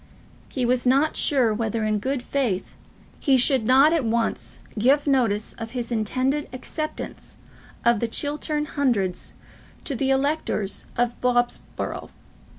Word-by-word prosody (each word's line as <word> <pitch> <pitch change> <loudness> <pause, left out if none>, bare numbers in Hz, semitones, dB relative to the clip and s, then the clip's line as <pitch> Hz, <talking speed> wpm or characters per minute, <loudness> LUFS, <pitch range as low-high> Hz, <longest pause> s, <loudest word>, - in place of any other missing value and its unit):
He 255 -3 -1
was 250 +1 +1
not 275 +5 +3
sure 255 -6 +2
whether, 225 0 -1
in 215 -1 +1
good 260 +3 -2
faith, 245 -11 -1 0.5
he 270 -2 +4
should 255 -2 +4
not 275 +5 +6
at 325 -5 +2
once 230 0 -1 0.2
give 275 +6 +4
notice 235 -7 +1
of 225 0 -6
his 240 0 -3
intended 255 +6 0
acceptance 305 +4 -6 0.5
of 235 -2 +4
the 235 - 0
Chiltern 295 +4 -1
Hundreds 235 -12 -1 0.5
to 280 - -2
the 265 +2 0
electors 270 -7 0
of 240 0 0
Bobsborough. 245 -1 -1
250 Hz, 135 wpm, -24 LUFS, 230-280 Hz, 0.5 s, not